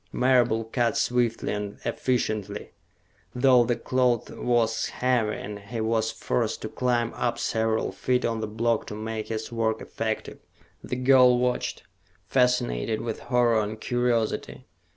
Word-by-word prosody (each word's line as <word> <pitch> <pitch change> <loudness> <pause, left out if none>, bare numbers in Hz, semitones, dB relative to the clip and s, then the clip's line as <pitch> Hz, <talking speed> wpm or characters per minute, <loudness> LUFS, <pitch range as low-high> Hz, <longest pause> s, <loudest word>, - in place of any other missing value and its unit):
Marable 120 -3 +3
cut 115 0 0
swiftly 120 -3 0
and 105 -1 -4
efficiently, 110 -5 -2 0.6
though 125 -1 +5
the 120 0 0
cloth 125 -1 0
was 115 -2 0
heavy 120 -4 0
and 105 0 -7
he 110 +4 -6
was 110 0 +1
forced 60 - -2
to - - -3
climb 120 -2 0
up 120 - -1
several 110 0 0
feet 125 -1 0
on 115 -1 -1
the - - -2
block 115 +1 0
to 105 - -6
make 110 0 -4
his 110 0 -4
work 110 -1 0
effective. 110 -1 -4 0.4
The - - -3
girl 125 -1 +5
watched, 125 0 -1 0.4
fascinated 120 - +1
with 115 -2 -4
horror 120 -3 +3
and 105 +1 -4
curiosity. 120 -2 -1
115 Hz, 140 wpm, -26 LUFS, 110-125 Hz, 0.6 s, though